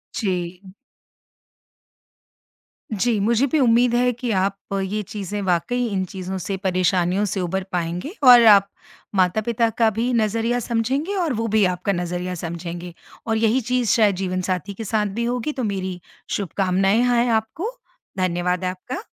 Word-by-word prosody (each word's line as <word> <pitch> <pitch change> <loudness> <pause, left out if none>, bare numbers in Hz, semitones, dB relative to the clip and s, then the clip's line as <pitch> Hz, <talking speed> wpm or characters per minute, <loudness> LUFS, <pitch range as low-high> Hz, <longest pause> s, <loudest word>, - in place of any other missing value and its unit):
जी। 180 -3 -3 2.3
जी, 220 +1 +1
मुझे 235 +6 +2
भी 310 +2 +1
उम्मीद 240 -1 +4
है 250 0 +3
कि 240 0 -3
आप 195 0 0 0.3
ये 210 +3 -2
चीज़ें 205 +1 -5
वाक़ई 195 +7 0
इन 195 -3 -1
चीज़ों 190 +1 -6
से, 190 +2 -3
परेशानियों 185 +1 +1
से 195 0 -2
उभर 190 +2 -2
पाएँगे 175 - -3
और 245 -2 +9
आप 200 -2 +7 0.5
माता-पिता 215 +5 +2
का 225 0 +2
भी 230 +4 -1
नज़रिया 230 +2 +1
समझेंगे 260 - -1
और 340 -8 0
वो 225 0 -2
भी 215 0 +3
आपका 180 +2 -1
नज़रिया 180 +1 -3
समझेंगे। 170 +1 -6 0.3
और 225 -1 +1
यही 230 +3 +2
चीज़ 250 -1 0
शायद 210 -4 +4
जीवनसाथी 185 +1 -2
के 225 - -7
साथ 215 0 0
भी - - 0
होगी। 245 +4 -1
तो 260 - -4
मेरी 190 -4 -3 0.4
शुभकामनाएँ 195 +2 +1
हैं 245 -1 +2
आपको। 225 - -1 0.5
धन्यवाद 180 0 0
आपका। 185 - -5
205 Hz, 145 wpm, -22 LUFS, 185-235 Hz, 2.3 s, और